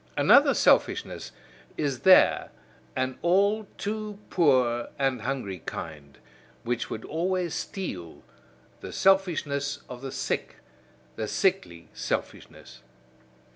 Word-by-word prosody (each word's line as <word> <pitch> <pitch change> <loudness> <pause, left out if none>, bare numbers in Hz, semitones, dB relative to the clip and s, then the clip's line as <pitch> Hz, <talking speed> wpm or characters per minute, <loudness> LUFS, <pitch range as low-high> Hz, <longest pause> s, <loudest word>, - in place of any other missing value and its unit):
Another - - +6
selfishness - - +2 0.5
is 140 -5 -1
there, 190 -1 +5 0.5
an 130 0 -2
all 200 +4 +2
too 210 0 -4
poor 130 -8 +3
and 135 -4 0
hungry 110 -7 -3
kind, 75 -3 -7 0.5
which 120 0 -2
would 110 - -6
always 175 +1 -1
steal 90 - -6 0.6
the - - -8
selfishness 155 -7 +1
of 125 -1 -9
the 135 -1 -6
sick, - - -3 0.6
the 110 - -3
sickly 185 - -1
selfishness. 60 -1 -5
140 Hz, 100 wpm, -27 LUFS, 120-190 Hz, 0.6 s, Another